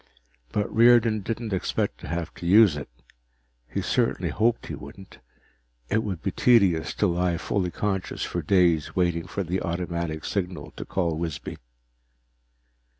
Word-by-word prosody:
But 105 - -1
Riordan 115 -1 +5
didn't 115 +1 -4
expect 95 - -1
to - - -9
have 85 +1 -3
to 85 - -7
use 100 -3 +6
it. 75 -4 -6 0.8
He - - -3
certainly - - 0
hoped 115 +2 +1
he - - -6
wouldn't. 90 +7 -11 0.7
It 110 - +2
would 95 -6 -5
be 95 - -1
tedious 100 -10 +3
to - - +1
lie 90 -1 +1
fully 90 +1 -1
conscious 95 0 -2
for 85 - -3
days 85 -2 +2
waiting 85 -2 0
for 100 - -3
the 90 +2 -2
automatic 85 -2 -3
signal 90 -3 -3
to - - -8
call 85 -4 -1
Wisby. 80 -5 -4
90 Hz, 150 wpm, -25 LUFS, 85-105 Hz, 0.8 s, use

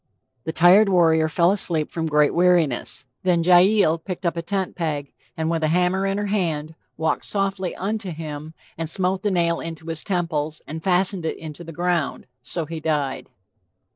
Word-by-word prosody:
The 160 - -2
tired 185 +6 +6
warrior 160 -4 +3
fell 170 +3 +3
asleep 170 -6 +1
from 165 -1 -2
great 150 -1 +3
weariness. 170 -8 +2 0.2
Then 175 -2 +2
Jael 180 -1 +5
picked 180 +2 -7
a 170 - +3
tent 190 +2 -3
peg 150 -5 -3 0.2
and 160 0 -1
with 165 -1 -1
a - - +3
hammer 180 +4 +1
in 195 0 -1
her 205 - -1
hand 165 -7 -1 0.2
"walked 160 - -1
softly 195 -2 -2
unto 205 +1 -3
him, 155 -1 -7 0.2
and 165 -1 -2
smote 185 +2 0
the 210 - 0
nail 170 -3 +1
into 165 -1 -7
his 160 -1 -3
temples, 160 -5 -2
and 160 +2 -7
fastened 185 0 +1
it - - -3
into 160 +1 -8
the 165 - -9
ground...So 160 -4 -3
he 160 +1 -6
died." 150 -4 -2
170 Hz, 170 wpm, -23 LUFS, 155-185 Hz, 0.2 s, tired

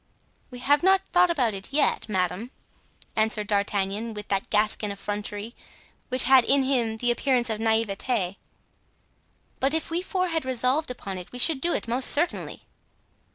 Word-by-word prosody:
"We 250 - -9
have 280 +4 +2
not 385 +1 +3
thought 360 0 +4
about 255 -10 +1
it 195 +4 -5
yet, 285 -5 +1
madame," 190 +3 -1 0.7
answered 220 -1 +1
D'Artagnan, 205 +2 -1
with 210 0 -8
that 195 -1 -1
Gascon 210 0 0
effrontery 205 +2 -5 0.5
which 255 -1 +3
had 260 -1 +6
in 275 +2 +3
him 240 -5 0
the 245 +1 +1
appearance 245 -1 +1
of 215 - -2
naivete; 220 -2 0 1.2
"but 275 +4 +1
if 320 - -2
we 340 +2 0
four 370 -1 -1
had 325 -1 -1
resolved 260 +4 0
upon 195 -6 -6
it 180 - -11
we 250 - -8
should 265 +2 +3
do 345 - +3
it - - -3
most 250 +3 +2
certainly." 340 +4 -2
240 Hz, 160 wpm, -25 LUFS, 210-275 Hz, 1.2 s, had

